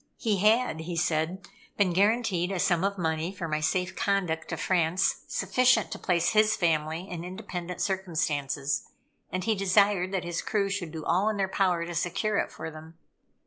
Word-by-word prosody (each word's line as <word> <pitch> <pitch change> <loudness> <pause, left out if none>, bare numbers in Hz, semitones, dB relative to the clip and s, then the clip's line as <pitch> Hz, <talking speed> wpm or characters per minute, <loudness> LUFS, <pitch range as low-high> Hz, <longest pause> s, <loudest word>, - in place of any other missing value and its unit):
He 215 -4 0
had, 215 -2 +3
he 170 +2 -5
said, 170 +2 -1 0.3
been 190 -4 +2
guaranteed 200 -2 +2
a 195 - -1
sum 175 0 +2
of 200 0 0
money 160 0 -1
for 185 -4 -5
my 155 -1 -1
safe 180 +4 -1
conduct 180 -5 0
to - - -4
France, 180 0 +1
sufficient 230 +3 +2
to - - -5
place 175 -2 +1
his 215 0 +4
family 165 -1 0
in 175 -3 -6
independent 180 -1 -6
circumstances, 150 -7 -1 0.4
and 185 +1 -2
he 225 - +2
desired 195 -1 +3
that 190 -2 -1
his 175 -1 -3
crew 200 -2 0
should 185 -5 -3
do 160 -1 -7
all 195 +5 +2
in 215 - -2
their 195 -1 +1
power 185 -3 +1
to 175 - -6
secure 200 +5 0
it - - -2
for 160 - -7
them. 160 +1 -12
180 Hz, 185 wpm, -28 LUFS, 165-200 Hz, 0.4 s, his